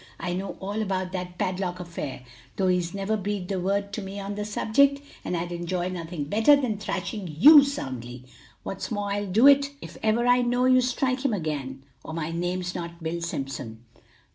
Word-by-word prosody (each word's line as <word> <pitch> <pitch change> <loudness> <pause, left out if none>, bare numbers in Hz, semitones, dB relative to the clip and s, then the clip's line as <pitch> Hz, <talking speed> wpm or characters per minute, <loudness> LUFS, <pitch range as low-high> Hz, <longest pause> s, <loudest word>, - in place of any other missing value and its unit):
I 175 - -2
know 190 +2 -4
all 200 +3 -3
about 185 -3 -2
that 180 -1 -5
padlock 185 -1 -2
affair, 170 -7 -6 0.3
though 190 -1 +1
he's 180 0 0
never 200 +2 -1
breathed 200 -2 -3
a 190 - 0
word 200 +2 -1
to 215 - -3
me 195 +1 -6
on 200 +1 -4
the 210 0 -4
subject, 275 +7 +3 0.2
and 180 - -2
I'd 175 +1 -3
enjoy 175 +1 -2
nothing 170 -3 -5
better 220 - +5
than 225 -7 -2
thrashing 190 -2 -4
you 295 - +10
soundly; 130 - -5 0.4
what's 195 - -5
more 205 -2 -2
I'll 205 0 -1
do 215 +7 +4
it 280 0 +7
if - - -10
ever 220 +2 +2
I 245 0 +5
know 245 +1 +1
you 255 0 +5
to 250 - 0
strike 255 +1 0
him 270 -5 +1
again; 140 -7 -3 0.2
or 160 - -7
my 165 -1 -3
name's 180 +1 -2
not 170 -1 -7
Bill 165 +1 -3
Simpson. 135 -8 -5
190 Hz, 195 wpm, -26 LUFS, 170-215 Hz, 0.4 s, you